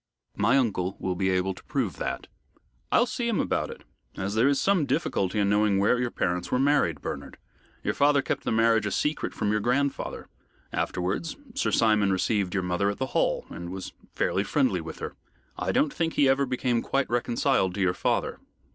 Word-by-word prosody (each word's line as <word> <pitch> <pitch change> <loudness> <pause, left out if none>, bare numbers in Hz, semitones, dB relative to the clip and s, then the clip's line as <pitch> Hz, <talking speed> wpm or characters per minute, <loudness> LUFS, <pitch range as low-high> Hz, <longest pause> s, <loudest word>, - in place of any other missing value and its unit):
"My 115 +6 +3
uncle 100 -7 0
will 95 - -1
be 95 +1 0
able 95 +1 +1
to - - -15
prove - - -2
that." - - -3 0.7
"I'll 240 - +5
see 240 0 -3
him 230 -4 +1
about - - 0
it, - - -10 0.3
as 100 +1 -2
there 115 +4 +3
is 140 -1 +3
some 185 -7 +2
difficulty 110 - 0
in 100 -1 +2
knowing 105 0 +3
where 105 +5 +3
your 125 -1 0
parents 90 -5 -2
were - - +3
married, 130 - +2
Bernard. - - -6 0.5
Your - - 0
father 145 -1 +3
kept - - -2
the - - -1
marriage 115 -1 +3
a - - -2
secret 150 +8 -1
from 105 -1 -1
you 105 - +2
grandfather. 135 +6 -1 0.5
Afterwards, 95 - -2 0.2
Sir 275 - 0
Simon 110 -3 +3
received 95 0 0
your 95 - 0
mother 90 +3 +1
at 100 - -3
the 130 - -1
Hall, - - +1
and 85 0 -6
was 95 0 -6 0.2
fairly 95 - +1
friendly 105 - +1
with 80 - -8
her. - - -5 0.4
I - - -1
don't 150 - +2
think 165 -1 -1
he 140 - +4
ever 135 +1 +3
became 125 -2 0
quite 135 0 0
reconciled 120 -6 +1
to 100 - -2
your 90 -1 +3
father." - - -1
110 Hz, 200 wpm, -27 LUFS, 95-135 Hz, 0.7 s, I'll